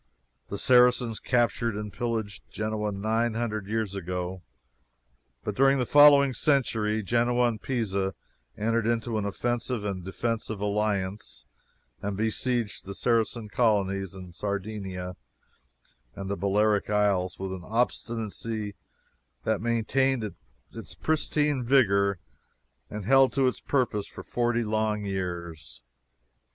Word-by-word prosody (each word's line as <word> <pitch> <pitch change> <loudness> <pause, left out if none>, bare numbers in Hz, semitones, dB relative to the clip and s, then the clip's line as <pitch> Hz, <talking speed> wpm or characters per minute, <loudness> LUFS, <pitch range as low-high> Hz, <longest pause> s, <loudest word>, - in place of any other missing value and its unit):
The 100 - -4
Saracens 125 -1 +4
captured 120 -2 +1
and 105 -1 -5
pillaged 110 -5 -3
Genoa 105 -1 -2
nine 110 +3 0
hundred 110 -4 -2
years 110 -2 -1
ago, 90 -1 -4 1.0
but 105 - -2
during 135 +4 +4
the 125 - +1
following 140 -1 +7
century 110 -6 +1
Genoa 120 +3 +2
and 110 -2 -5
Pisa 100 -7 -1 0.4
entered 115 +1 +1
into 115 -1 0
an 105 - -2
offensive 120 +2 -2
and 95 -3 -3
defensive 110 +2 -3
alliance 100 - -2 0.6
and 100 -1 -3
besieged 110 +1 -1
the 100 0 -7
Saracen 115 -1 0
colonies 100 -4 +1
in 90 -2 -9
Sardinia 95 -1 -4 1.0
and 100 0 -5
the - - 0
Balearic 100 +2 +1
Isles 100 -3 +1
with 95 0 -4
an 95 - -6
obstinacy 110 -1 -2 0.7
that 110 -2 0
maintained 120 0 +1 0.4
its - - -9
pristine 150 -3 0
vigor 100 -6 +3 0.7
and 105 -2 -6
held 135 +3 +5
to 135 -1 +2
its 125 - -1
purpose 120 -7 0
for - - -10
forty 120 -1 0
long 110 -1 0
years. 85 -7 -5
110 Hz, 120 wpm, -27 LUFS, 100-120 Hz, 1.0 s, following